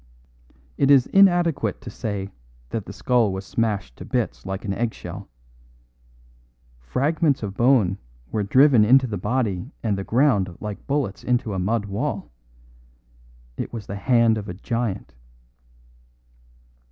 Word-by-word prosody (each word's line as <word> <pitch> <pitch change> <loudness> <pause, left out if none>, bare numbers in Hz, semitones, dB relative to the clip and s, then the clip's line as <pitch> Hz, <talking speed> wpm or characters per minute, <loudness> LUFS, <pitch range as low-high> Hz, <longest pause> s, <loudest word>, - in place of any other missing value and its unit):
It 140 - +3
is 135 -3 +6
inadequate 175 -5 +3
to - - -8
say 100 -4 -4 0.4
that 110 -3 -4
the - - -6
skull 120 -5 +1
was 95 +1 -5
smashed 105 - -2
to - - -8
bits - - -2
like 95 +2 -4
an 100 - -1
eggshell. 100 -4 -5 1.5
Fragments 140 - 0
of 100 -2 -4
bone 115 -6 +3 0.3
were 110 - 0
driven 130 +3 +5
into 130 +5 +5
the 105 -6 -4
body 105 -1 -1
and 110 -3 +1
the - - -3
ground 105 - +2
like 105 -2 -7
bullets 140 -8 -1
into 125 -4 0
a 95 - -2
mud 105 +3 0
wall. 105 - -3 1.3
It - - -4
was 115 -4 -6
the 100 - -6
hand 115 0 +3
of 105 - -8
a 90 - -5
giant." 115 0 -3
110 Hz, 140 wpm, -23 LUFS, 100-130 Hz, 1.5 s, is